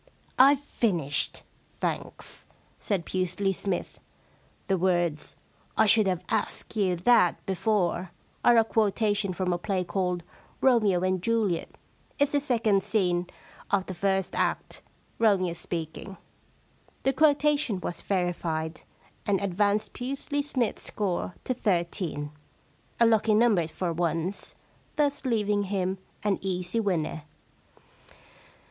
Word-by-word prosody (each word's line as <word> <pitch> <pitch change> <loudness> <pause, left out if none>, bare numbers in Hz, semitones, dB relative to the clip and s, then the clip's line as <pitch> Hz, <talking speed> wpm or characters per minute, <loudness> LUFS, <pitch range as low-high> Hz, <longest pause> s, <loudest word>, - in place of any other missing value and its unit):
* - - -18
I've 285 -1 +2
finished, 175 - -1 0.4
thanks,' - - -4 0.3
said 190 -5 -1
Pusely 185 +1 0
Smythe. 190 -1 -3 0.4
* - - -34
The 195 - +1
words, 175 -4 0 0.4
I 220 - +6
should 215 -1 +5
have 180 -1 -1
asked - - -2
you 190 -4 +2
that 180 -1 +3
before," 190 -2 0 0.3
are 240 -1 +6
a 225 - +7
quotation 210 -2 +1
from 180 0 -1
a 175 - -2
play 190 0 -1
called 180 -2 -1 0.4
Romeo 215 -8 +3
and 185 -1 0
Juliet, 215 -5 0 0.4
It's 285 0 +2
the 290 - +3
second 225 -8 +2
scene 180 -4 +1 0.4
of 195 -2 +1
the 185 - -5
first 195 0 0
act - - -1 0.2
— - - -36
Romeo 195 -6 +3
speaking.' 170 +3 -5 0.9
The 270 - +2
quotation 295 -7 +3
was 175 -1 -5
verified, 170 -4 -2 0.5
and 200 -2 +2
advanced 205 +2 0
Pusely 275 +3 -3
Smythe's 260 -6 -1
score 185 -4 -2
to 255 - -1
thirteen 170 -8 -1 0.3
— - - -35
a 235 - +6
lucky 220 -1 +4
number 210 -7 +4
for 170 +1 -3
once 170 +3 -2 0.2
— - - -34
thus 285 -2 0
leaving 210 -4 +1
him 190 -1 -1 0.2
an 205 -2 +1
easy 185 +2 -2
winner. 170 -7 -1
195 Hz, 130 wpm, -27 LUFS, 175-220 Hz, 0.9 s, a